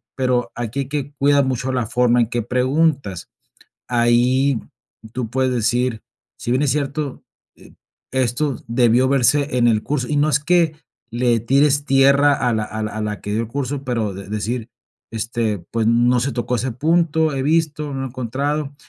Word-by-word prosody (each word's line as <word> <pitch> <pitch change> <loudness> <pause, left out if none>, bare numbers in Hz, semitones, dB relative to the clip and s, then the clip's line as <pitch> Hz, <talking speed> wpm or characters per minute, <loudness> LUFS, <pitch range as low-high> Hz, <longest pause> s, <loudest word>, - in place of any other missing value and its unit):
pero, 125 -2 0
aquí 120 +2 -4
hay 135 - -5
que 145 -1 -4
cuidar 140 0 +4
mucho 130 0 -2
la 125 -2 -1
forma 125 +1 +2
en 115 - +1
que 120 +1 -2
preguntas. 130 - 0 0.6
Ahí, 120 +2 +2 0.5
tú 125 -3 -3
puedes 130 +1 0
decir, 120 0 0 0.3
si 120 - -4
bien 130 +2 +2
es 145 - +2
cierto, 145 -1 -3 0.3
eh, - - -18 0.4
esto 130 +1 0
debió 120 +1 +3
verse 140 +1 +2
en 120 -1 +4
el 110 -2 +2
curso 135 -4 -2
y 150 - 0
no 150 +2 +3
es 150 - +2
que 165 0 +2 0.4
le 120 0 +1
tires 140 +5 +2
tierra 140 +1 +4
a 120 - +2
la 110 -1 0
a 110 +1 -5
la 110 - -3
a 110 - -4
la 105 -1 -3
que 105 - -5
dio 110 +2 0
el 115 - -4
curso, 135 +2 -4
pero 115 -6 -2
de 95 +1 -9
decir, 110 +3 -3 0.4
este, 115 -1 -2
pues 115 -1 0
no 120 +2 +3
se 135 +4 -1
tocó 125 0 -2
ese 125 +2 -2
punto, 160 +3 +1
he 135 - -2
visto, 150 -1 0
no 135 0 -3
he - - -3
encontrado. 140 +4 -3
125 Hz, 185 wpm, -20 LUFS, 120-140 Hz, 0.6 s, cuidar